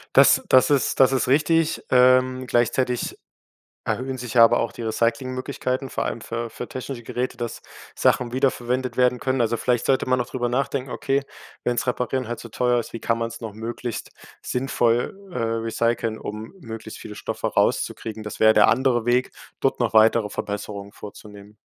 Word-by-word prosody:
Das - - +7
das 130 +2 +5
ist 140 -2 +1
das 130 0 +6
ist 130 - +1
richtig. 160 +4 +2
Ähm, 130 0 +4
gleichzeitig 120 +1 0 0.7
erhöhen 130 +1 -2
sich 120 -2 -6
ja 115 - +8
aber 115 - +4
auch 115 - -2
die - - -8
Recycling-Möglichkeiten, 130 +3 -2
vor - - -2
allem 115 - -3
für 115 0 -4
für 120 +2 -7
technische 130 -1 -6
Geräte, 125 +2 -3
dass 120 -1 -5 0.3
Sachen 120 -1 +2
wiederverwendet 130 -1 0
werden 125 0 +3
können. 130 -1 0
Also 115 0 +1
vielleicht 125 -2 0
sollte 135 - +2
man 130 -1 +2
auch 120 - -1
drüber 120 -2 -1
nachdenken: 135 +1 -1
„Okay, 140 +2 -1 0.4
wenn's 120 0 0
Reparieren 125 +1 -1
halt 120 +1 -4
zu 115 - -9
teuer 125 +2 +1
ist, 115 - -9
wie 115 - -5
kann 115 +1 0
man's 115 +1 -4
noch 110 -2 -5
möglichst 115 +2 -5 0.3
sinnvoll, 120 -2 0 0.2
äh, 175 - -8
recyceln, 115 0 -1
um 105 - -7
möglichst 115 -3 -8
viele - - -9
Stoffe - - -4
rauszukriegen?“ 110 -1 -1
Das 105 0 -7
wär 110 0 +6
der 105 - +6
andere 125 -2 +2
Weg, 125 +2 +1 0.3
dort 135 - +1
noch 120 -4 0
weitere 110 -1 +4
Verbesserungen 100 0 -5
vorzunehmen. 105 0 -12
120 Hz, 175 wpm, -23 LUFS, 115-130 Hz, 0.7 s, ja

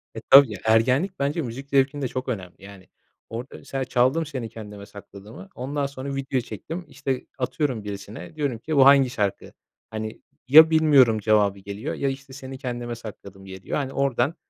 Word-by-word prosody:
E, - - -6
tabii, 135 -4 +9
ya, - - -8
ergenlik 130 - +2
bence 145 +4 0
müzik 135 +1 -7
zevkinde 140 0 +1
çok 130 +1 -5
önemli, 95 -6 -5
yani, 100 -2 -13 0.4
orada 120 +4 -7
mesela 135 -1 -4
çaldım, 130 +7 +2
Seni 130 -6 -5
Kendime 105 -2 -10
Sakladım'ı. 105 - -12
Ondan 140 +3 -3
sonra 140 0 -5
video 135 -1 -1
çektim, 155 - -7
işte, 135 -2 -4
atıyorum 130 -3 -2
birisine 105 +7 -8
diyorum 140 -7 -2
ki 155 +5 -3
bu 135 -1 +6
hangi 140 -2 +6
şarkı? 100 -5 -3 0.4
Hani 110 0 -6 0.3
ya 160 +4 +9
bilmiyorum 145 -8 +5
cevabı 105 -2 +2
geliyor, 100 +2 -6
ya, 140 - -1
işte, 135 0 -8
Seni 135 -1 -8
Kendime 120 -2 -5
Sakladım, 100 -4 -11
geliyor. 95 -1 -5
Hani 135 -2 -3
oradan 140 +3 0
130 Hz, 170 wpm, -24 LUFS, 110-140 Hz, 0.4 s, tabii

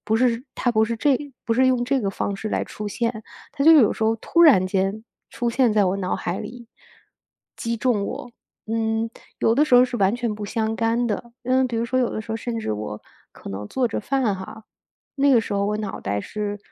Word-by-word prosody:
不 220 +1 +1
是， 240 0 +2
它 245 - 0
不 220 - +3
是 230 0 -2
这 270 +2 +2 0.3
不 230 - 0
是 260 +2 +4
用 250 -2 +2
这 270 +1 +1
个 200 - -1
方 195 +1 -2
式 215 +2 -5
来 - - -1
出 210 0 -6
现， 225 0 -2 0.3
它 275 - -2
就 325 +2 +8
有 270 -10 +6
时 - - -5
候 225 +1 +2
突 335 +9 0
然 220 - +7
间 195 +3 -1 0.2
出 240 0 -2
现 250 0 +3
在 205 -2 +4
我 185 +1 +1
脑 185 -1 -1
海 175 +2 -3
里， 235 +2 -8 0.9
击 230 0 -2
中 220 -3 +1
我。 245 - -6 0.4
嗯， 225 0 -1 0.3
有 225 - +3
的 290 - +4
时 250 - +3
候 250 +1 +8
是 245 -1 -4
完 200 +4 +2
全 235 -3 -2
不 210 - -6
相 220 0 -1
干 230 +1 +1
的， 235 +2 -4
嗯， 255 +1 +2
比 235 - -4
如 230 - 0
说 255 +2 0
有 245 - +2
的 215 - -4
时 220 - -6
候 225 - -1
甚 230 0 -4
至 215 - -2
我 105 0 -5 0.3
可 - - -10
能 100 +1 -6
做 255 -2 0
着 - - -3
饭 250 -3 0
哈， 190 +4 -9 0.5
那 280 0 +4
个 235 - +6
时 - - -5
候 200 0 +1
我 210 - 0
脑 205 -2 -5
袋 100 +1 -2
是 205 - -4
225 Hz, 255 characters per minute, -23 LUFS, 205-245 Hz, 0.9 s, 就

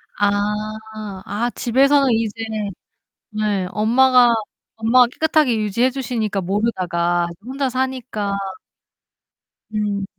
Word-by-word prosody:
아. 205 0 +2 0.9
아, 225 +4 -1
집에서는 275 +3 +3
이제 225 -2 0 1.0
네 210 -3 -1
엄마가 245 +3 +5 0.5
엄마가 235 +2 +4
깨끗하게 305 -7 +2
유지해 215 +4 +1
주시니까 225 -6 -2
모르다가 175 -4 0
이제 170 - -14
혼자 270 0 -1
사니까. 255 -6 -2 1.4
음. 205 -2 -1
225 Hz, 225 characters per minute, -20 LUFS, 205-255 Hz, 1.4 s, 엄마가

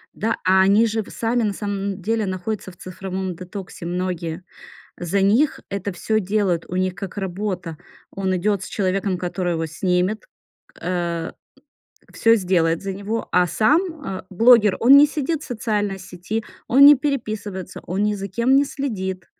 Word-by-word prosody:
Да. 225 +2 -1
А 190 +1 +5
они 200 +4 +5
же 220 0 -1
в - - -14
сами 235 +1 -1
на 205 -2 0
самом 200 -1 -4
деле 220 +3 0
находятся 190 +1 -4
в 175 - -20
цифровом 185 0 -5
детоксе 180 -1 -8
многие. 175 -1 -3 0.6
За 180 +3 -1
них 225 +10 +3
это 200 0 -4
всё 215 +5 0
делают, 195 -3 0
у 180 - -4
них 185 0 0
как 195 +2 -7
работа. 185 -3 -4 0.3
Он 190 -1 -2
идёт 200 +1 0
с - - -6
человеком, 190 -1 -1
который 180 0 -2
его 165 0 -2
снимет, 180 +5 -1 0.6
э, 170 -2 -2 0.8
всё 230 0 +4
сделает 175 -4 +1
за 195 -1 -4
него. 205 +4 -4
А 180 0 +3
сам, 285 - +3 0.2
э, 190 -1 -5
блогер, 220 +1 +5
он 265 +4 +8
не 290 - +8
сидит 305 +1 -2
в - - -9
социальной 210 -5 -2
сети, 185 +5 -5 0.2
он 275 +3 +7
не 290 0 +10
переписывается, 215 -9 -4
он 190 +4 -1
ни 210 0 +1
за 195 0 -5
кем 235 +7 +2
не 280 +1 +4
следит. 190 -11 -4
195 Hz, 165 wpm, -22 LUFS, 180-220 Hz, 0.8 s, не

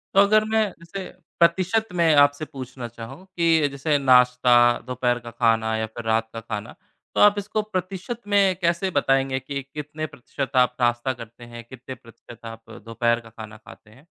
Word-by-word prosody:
तो 200 - +8
अगर 215 +2 +4
मैं 220 - +3 0.2
इसे, 190 +3 -7 0.4
प्रतिशत 185 +6 +2
में 165 -3 +3
आपसे 145 +1 +4
पूछना 130 -4 -8
चाहूँ, 120 +9 -11
कि 165 -5 +2
जैसे 145 +2 0
नाश्ता, 125 -2 +4
दोपहर 125 -1 -1
का 120 0 -10
खाना 115 -1 +1
या 110 - -1
फिर 115 +1 -9
रात 110 0 0
का 115 - -5
खाना 105 -2 -6 0.4
तो - - +2
आप 205 0 +6
इसको 210 +2 -2
प्रतिशत 195 +3 -5
में 200 -2 +3
कैसे 170 +2 0
बताएँगे, 135 -2 +1
कि 140 +1 -5
कितने 150 +1 -5
प्रतिशत 135 +1 -6
आप 125 -1 +3
नाश्ता 120 +2 +1
करते 115 0 -12
हैं? 120 0 -10
कितने 130 0 -9
प्रतिशत 115 0 -16
आप 115 0 -10 0.2
दोपहर 115 +1 0
का 115 -1 -15
खाना 110 -1 -11
खाते 110 0 -16
हैं? 130 +8 -20
130 Hz, 180 wpm, -23 LUFS, 120-170 Hz, 0.4 s, तो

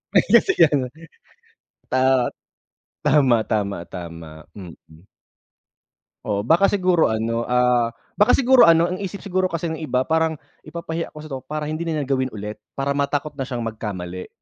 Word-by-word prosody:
Ay - - +6
kasi 370 - +6
ganun. 145 -6 +3 1.0
Tama. 130 -1 +2 0.8
Tama, 135 -6 +4
tama, 100 -3 -1
tama, 85 -3 -9
mm. 85 -2 -13 1.2
Oo, 100 -1 -1
baka 170 - +4
siguro 185 -4 +2
ano, 115 +1 -1
ah, 125 -1 +2 0.2
baka 210 +4 +6
siguro 260 -5 +6
ano 165 +2 +4
ang 185 - -4
isip 195 0 -6
siguro 185 -1 0
kasi 165 -1 -3
ng 160 - -5
iba 130 -4 0
parang, 160 +1 +1 0.3
"Ipapahiya 165 0 -5
ko 150 - -9
kasi 155 - -11
to 135 - -4
para 150 0 -4
hindi 155 +3 -4
na 155 -2 -1
niya - - -6
gawin 130 -1 +1
ulit, 105 +1 -6 0.2
para 140 +1 -1
matakot 140 +1 -1
na 135 - -2
siyang 120 -3 -4
magkamali." 95 -5 -5
135 Hz, 160 wpm, -22 LUFS, 110-165 Hz, 1.2 s, Ay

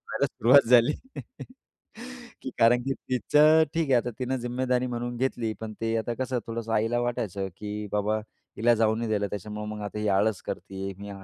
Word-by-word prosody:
व्हायला - - 0
सुरुवात 130 +4 +5
झाली. 125 +3 +6 1.5
की - - -5
कारण 120 +2 +5
की 135 +2 -1
तिचं 150 +7 +4
ठीक 165 -3 0
आहे - - +5
आता 120 0 +1
तिनं 130 +1 -1
जिम्मेदारी 125 +1 -1
म्हणून 120 0 -4
घेतली. 120 -3 -1
पण 110 -1 -5
ते 115 0 0
आता 120 +2 -2
कसं 130 -1 -1
थोडंसं 115 0 -4
आईला 115 +2 +1
वाटायचं, 100 -5 -2
की 105 0 -5
"बाबा 105 +1 +1 0.4
हिला 120 +2 +4
जाऊ 110 -1 +2
नाही 115 0 -3
द्यायला 105 -1 0
त्याच्यामुळं 105 +1 -5
मग 105 0 -6
आता 105 +1 -5
ही 105 - -1
आळस 100 +1 +1
करतीये. 95 0 -5
मी 100 0 -8
115 Hz, 180 wpm, -27 LUFS, 105-125 Hz, 1.5 s, झाली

